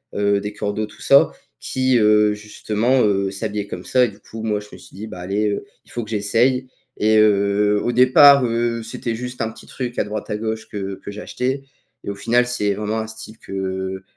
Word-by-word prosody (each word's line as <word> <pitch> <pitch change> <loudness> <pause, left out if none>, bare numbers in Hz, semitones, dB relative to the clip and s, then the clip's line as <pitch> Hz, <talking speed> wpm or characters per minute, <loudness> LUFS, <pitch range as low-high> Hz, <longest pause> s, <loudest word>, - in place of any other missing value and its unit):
heu, 100 0 +2
des 105 0 -5
coordinateurs, 105 +1 -2
tout - - -17
ça, 140 - +5 0.3
qui 130 -1 +1
heu, 105 0 +4
justement, 110 +4 0
heu, 100 -2 +1
s'habillaient 105 0 -3
comme 90 -2 -7
ça 125 -1 +3
et - - -3
du 100 0 -16
coup, 110 +2 -9
moi, 105 -2 0
je 105 - -13
me - - -9
suis - - -16
dit: 110 +3 -7
«Bah, 90 - -9
allez, 105 +3 0
heu, 100 - -3 0.2
il - - -19
faut 120 - -3
que 110 - -10
j'essaye» 120 +5 +1 0.3
et 110 +1 +3
heu, 105 0 +3
au 120 - 0
départ 130 +2 +7
heu, 115 0 -1
c'était 115 0 -4
juste 125 +1 -6
un 110 0 -1
petit - - -14
truc 125 -2 -5
à - - +3
droite 105 0 -5
à 105 - -1
gauche 110 0 -4
que 100 -2 -4
que - - -7
j'achetais 130 +6 -3 0.4
et - - -5
au - - -6
final, 120 +4 +2
c'est 105 -5 0
vraiment 105 +2 -2
un 110 - -4
style 110 0 -10
que 95 0 -4
110 Hz, 220 wpm, -21 LUFS, 100-120 Hz, 0.4 s, départ